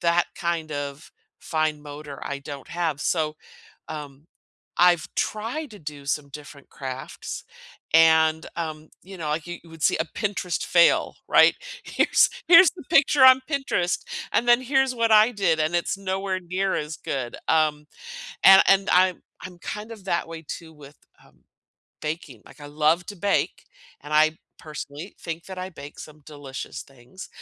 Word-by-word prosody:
that 170 0 +3
kind 170 -3 -3
of 145 +1 -6 0.3
fine 155 -2 -1
motor, 145 -1 -9
I 140 - -4
don't 140 0 -9
have, 165 -4 -2
so, 155 -3 0 0.5
um, 145 -2 -8 0.5
I've 175 -2 +4
tried 235 +8 -3
to 210 - -11
do 145 -2 -9
some 145 0 -2
different 145 0 -12
crafts, 130 -1 -7 0.5
and, 160 -1 +5
um, 155 -2 -5
you 190 0 -11
know, 155 -3 -4
like, 150 +2 -2
you 175 0 -6
would 165 -1 -12
see - - +3
a 160 - -1
Pinterest 195 -1 -3
fail, 170 -1 +3
right? - - +6 0.3
"Here's - - +3 0.2
here's 345 0 +9
the 355 - -12
picture 280 -3 +5
on 260 0 +8
Pinterest, 270 - 0 0.3
and 240 - +1
then 240 +1 +5
here's 265 0 +1
what 230 -2 +1
I 215 +2 +7
did," 180 -7 +1
and 155 +3 0
it's 175 +3 -1
nowhere 190 -1 -2
near 185 +2 -2
as 150 +1 -4
good. 130 -3 -4
Um 155 -2 +2 0.6
and 195 0 +9
and 195 0 +4
I'm 185 0 +3 0.2
I'm 180 -1 -9
kind 210 +5 -7
of 215 -4 -12
that 170 -2 -1
way 165 -1 -9
too 160 +1 -8
with, 145 -1 -15 0.3
uh, - - -22 0.7
baking. 150 -7 -5
Like, - - -16
I 145 - -9
love 155 +4 +1
to 205 - -8
bake, 200 +3 -1 0.4
and 150 - -9
I, 155 +1 +4 0.2
personally, 150 +3 -8
think 165 0 -6
that 190 -1 -8
I 185 0 -4
bake 145 -4 -11
some 155 0 -12
delicious 145 -3 -8
things, 135 +6 -13
165 Hz, 165 wpm, -24 LUFS, 150-190 Hz, 0.7 s, here's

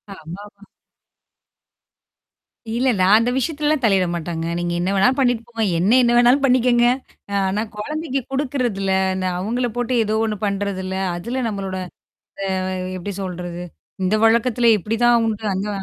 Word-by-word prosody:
ஆமாமா. 200 +5 -11 2.1
இல்லல்ல. 240 -6 +2
அந்த 230 +2 +1
விஷயத்துலலாம் 300 +1 0
தலையிட 195 -5 +3
மாட்டாங்க. 165 -1 -4
நீங்க 175 0 -2
என்ன 180 +2 -1
வேணாலும் 250 +8 +3
பண்ணிட்டு 245 -3 +1
போங்க. 230 -1 -2 0.2
என்ன 190 +5 +2
என்ன 240 0 +3
வேணாலும் 245 +3 +4
பண்ணிக்கங்க. 250 -2 +3 0.6
ஆனா 205 +3 -1
குழந்தைக்கு 290 +4 -3
குடுக்குறதில, 250 -8 -1 0.2
இந்த 185 0 -2
அவங்கள 240 +6 -1
போட்டு 245 +1 -1
ஏதோ 215 +1 -1
ஒண்ணு 215 -1 -2
பண்றதில. 195 -2 -2 0.2
அதுல 235 +9 -3
நம்மளோட 195 -2 -4 1.0
அ - - -2 0.2
எப்படி 190 +2 -5
சொல்றது? 175 -1 -5 0.4
இந்த 185 +3 +1
வழக்கத்தில 235 +1 +3
இப்படிதான் 230 +4 +2
உண்டு 220 -1 -3
அந்த 195 +2 -2
220 Hz, 130 wpm, -21 LUFS, 190-245 Hz, 2.1 s, வேணாலும்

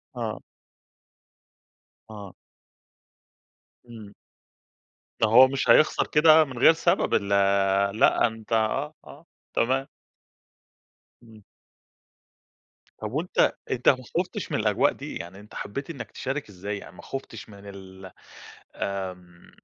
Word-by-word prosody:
آه. - - -4 1.7
آه. 100 -4 -10 1.6
إمم. 110 -3 -12 1.1
ما 110 - +4
هو 125 +4 +8
مش 135 0 -3
هيخسر 155 - +4
كده 155 +1 +6
من 130 -4 -9
غير 160 - +6
سبب 160 - 0
ال 100 - +1 0.7
لأ، - - +4
أنتَ 110 0 -11
آه، 135 +7 0
آه 155 +4 -15 0.3
تمام. 135 +3 0 1.3
امم. 110 -3 -17 1.5
طب 110 0 -6
وأنتَ 160 +6 +1 0.2
أنتَ 125 -1 +3
ما 130 - +3 0.2
خُفْتش 180 - -3
من - - 0
الأجواء - - +2
دي؟ - - -8
يعني 95 +3 -8
أنتَ 105 - -15
حبيت 140 +9 -6
إنك 125 -10 -8
تشارك 135 -2 -5
إزاي 100 +2 -6
يعني - - -12
ما - - -12
خُفْتش 115 -6 -8
من 100 -1 -13
ال 95 -1 -11 0.6
آمم 90 -3 -6
110 Hz, 115 wpm, -25 LUFS, 100-135 Hz, 1.7 s, هو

